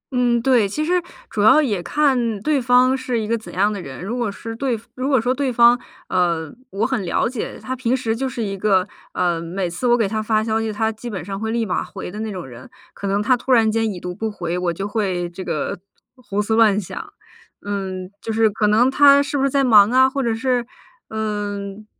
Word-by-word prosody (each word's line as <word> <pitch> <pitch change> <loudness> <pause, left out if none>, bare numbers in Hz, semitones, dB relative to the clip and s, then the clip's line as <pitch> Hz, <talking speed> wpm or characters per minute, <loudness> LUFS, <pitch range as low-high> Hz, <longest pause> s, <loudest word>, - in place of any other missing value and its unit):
嗯， 240 -1 +2
对， 245 -6 +3
其 305 +10 -2
实 360 +2 +2 0.3
主 210 - -3
要 220 +8 +7
也 210 -11 0
看 245 -4 +1
对 295 -1 +1
方 250 +2 +4
是 255 -3 -2
一 215 - -3
个 230 - +1
怎 225 - -8
样 205 +3 +2
的 195 - -5
人。 135 +2 -8
如 230 +5 -3
果 235 -5 -1
是 225 +3 -7
对 245 -2 -1
如 260 +2 -3
果 265 - +4
说 245 +3 +1
对 265 -1 -1
方， 235 +1 +6 0.3
呃， 170 -4 0 0.2
我 205 +1 -1
很 250 -5 -1
了 175 - 0
解， 240 -2 -5
他 260 - -4
平 255 0 0
时 225 -3 -1
就 265 +2 -2
是 235 -2 -4
一 200 -2 -3
个， 190 -2 +2 0.3
呃， 175 -2 0
每 180 +2 -3
次 180 +9 -3
我 240 - +4
给 225 -4 +1
他 215 +2 -2
发 215 0 +1
消 220 0 0
息， 225 -1 -2
他 220 +1 0
基 225 +2 -8
本 185 -7 -5
上 195 0 -5
会 220 +1 -3
立 230 0 0
马 185 - -1
回 190 -2 -8
的 210 - -7
那 220 -1 -3
种 180 -5 -6
人， 125 -1 -12 0.2
可 200 - -6
能 200 +1 0
他 255 - +4
突 255 +2 -4
然 225 -3 +5
间 225 0 0
已 185 - -7
读 180 0 -5
不 220 +4 -3
回， 175 -5 -4
我 180 -1 0
就 195 +4 -4
会 190 -5 -1
这 185 +2 -7
个 155 0 -3 0.4
胡 205 -5 -5
思 220 - -1
乱 215 -3 +4
想。 410 - -7 0.5
嗯， 190 -2 -4
就 225 - -4
是 220 -1 +3
可 210 +1 +1
能 230 +5 +4
他 280 +1 +6
是 290 - -4
不 275 - +1
是 275 - +3
在 275 +1 +2
忙 215 -5 +6
啊？ 260 +2 +5
或 275 +1 -2
者 230 -3 0
是， 250 +1 0 0.5
嗯 205 -1 -4
220 Hz, 255 characters per minute, -21 LUFS, 195-250 Hz, 0.5 s, 要